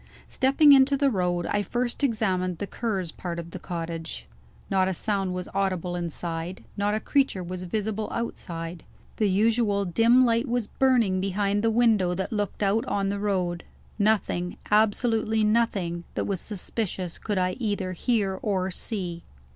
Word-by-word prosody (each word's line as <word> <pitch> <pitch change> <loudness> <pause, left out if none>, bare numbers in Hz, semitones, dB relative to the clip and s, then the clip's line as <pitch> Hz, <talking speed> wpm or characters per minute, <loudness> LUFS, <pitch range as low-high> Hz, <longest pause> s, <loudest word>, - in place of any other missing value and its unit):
Stepping 275 +3 +5
into 275 +1 +5
the 280 -1 +3
road, 180 -4 0
I 205 - 0
first 240 +6 -2
examined 190 -8 0
the 205 - -3
Cur's 195 -6 -2
part 175 -2 -5
of 170 0 -6
the - - -7
cottage. 165 - -5 0.4
Not 190 -1 +2
a 190 - -1
sound 195 -2 -1
was 180 0 -4
audible 185 -3 -1
inside; 170 +1 -4
not 205 +1 0
a - - 0
creature 265 -6 +1
was 180 +1 -5
visible 215 +3 -2
outside. 170 -7 -5 0.3
The 210 -2 +2
usual 205 0 +2
dim 230 +8 +5
light 230 +2 +2
was 240 -2 0
burning 230 -8 +2
behind 200 +1 0
the 225 - +2
window 220 -6 +3
that 190 +5 -3
looked 205 0 -2
out 205 +3 +2
on 195 -1 0
the 200 0 -2
road. 180 -4 -1 0.4
Nothing, 200 -4 +1
absolutely 220 +1 +2
nothing, 205 -6 +1
that - - -1
was 195 -3 -2
suspicious 190 -3 -4
could 205 -3 -2
I 185 0 +2
either 205 -5 -1
hear 195 -1 0
or 190 -3 0
see. 175 -4 -4
200 Hz, 160 wpm, -26 LUFS, 180-225 Hz, 0.4 s, Stepping